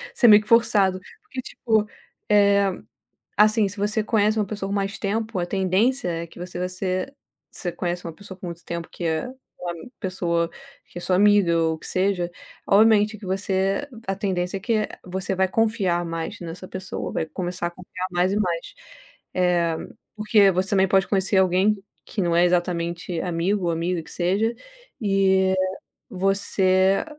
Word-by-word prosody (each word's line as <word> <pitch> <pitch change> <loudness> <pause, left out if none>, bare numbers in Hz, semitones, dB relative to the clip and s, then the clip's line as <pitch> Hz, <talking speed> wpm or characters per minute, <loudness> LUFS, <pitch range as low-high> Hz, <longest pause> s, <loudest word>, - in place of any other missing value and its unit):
isso - - +3
é - - +10
meio 210 0 +9
que 210 - -16
forçado, 200 -5 +4 0.2
porque 265 -12 -7
tipo, 220 -4 0 0.4
eh, 200 -1 +4 0.7
assim, 215 0 +5
se 200 +2 -7
você 210 +2 0
conhece 215 0 +2
uma 210 - +1
pessoa 195 -1 -5
por 200 - -2
mais 195 0 -2
tempo 220 0 -2
a 175 - 0
tendência 190 +5 +1
é 170 0 -3
que 170 - -15
você 180 0 -6
vai 180 - -1
ser 185 +6 -3 0.4
você 175 - -3
conhece 175 0 -3
uma 165 - -5
pessoa 190 +2 -11
com 180 - -6
muito 170 0 -8
tempo, 170 -1 -5
que - - -8
é 160 +7 0 0.3
uma 175 -1 -4 0.3
pessoa 170 -3 -1 0.4
que - - -12
é - - -5
sua 180 +1 +1
amiga 200 -3 +4
ou 160 -1 +1
o - - -12
que - - -12
seja, 185 -2 0 0.4
obviamente 215 +1 +5
que 205 - -11
você 195 +5 0 0.2
a 195 - 0
tendência 185 -1 -2
é - - -7
que 215 0 0 0.2
você 190 +1 -3
vai 190 0 +2
confiar 195 -5 +1
mais 165 -1 -4
nessa 175 +2 -8
pessoa, 185 0 -5
vai - - -1
começar 175 +2 -3
a 175 - -6
confiar 185 +1 -6
mais 180 +2 +1
e 205 - 0
mais. 175 -5 -2 0.6
Eh, 175 -2 +2 0.4
porque 215 -2 +4
você 185 +2 -1
também 190 -1 +4
pode 195 0 +3
conhecer 195 0 +1
alguém 190 +3 +3 0.3
que 205 - -3
não 170 -1 +1
é 175 - +5
exatamente 175 -1 -1
amigo 180 +3 -1
ou 170 - +1
amiga 170 +1 -1
que - - -14
seja, 195 +6 0 0.5
e 190 -2 +3 0.6
você 190 0 +2
190 Hz, 180 wpm, -23 LUFS, 175-205 Hz, 0.7 s, é